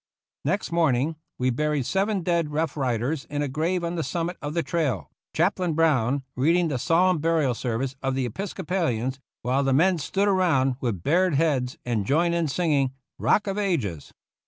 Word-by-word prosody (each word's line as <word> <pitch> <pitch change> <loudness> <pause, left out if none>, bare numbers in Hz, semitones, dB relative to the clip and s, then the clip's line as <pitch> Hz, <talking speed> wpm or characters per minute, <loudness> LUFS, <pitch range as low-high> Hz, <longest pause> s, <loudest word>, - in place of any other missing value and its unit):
Next 195 -2 -1
morning 160 -2 +2 0.2
we 125 0 +1
buried 150 +1 0
seven 195 - 0
dead 170 -3 +1
Rough 155 +2 -1
Riders 130 +1 -1
in 145 0 -2
a - - -1
grave 165 +6 -1
on 170 0 -2
the 165 - 0
summit 175 +2 -2
of 150 +1 -4
the 170 - +1
trail. 145 - -1 0.2
Chaplain 175 -1 +1
Brown 140 -4 +2
reading 165 +6 +2
the 135 -4 -2
solemn 175 +5 +3
burial 160 -4 +2
service 125 +3 -2
of 135 -1 -1
the 130 -1 0
Episcopalians, 135 - -2 0.2
while 130 +3 +1
the 135 -1 +2
men 175 +5 +3
stood 195 +7 0
around - - +4
io8 - - +3
GENERAL 180 -6 +3
YOUNG'S 130 0 +2
FIGHT 125 - -16
with 105 -9 -2
bared 175 +1 +3
heads 135 -5 +1
and 115 -5 -1
joined 170 +4 +2
in 170 -2 +1
singing, 140 -3 +1 0.3
"Rock 210 - +3
of 200 0 -2
Ages." 130 - -2
150 Hz, 190 wpm, -25 LUFS, 130-170 Hz, 0.3 s, around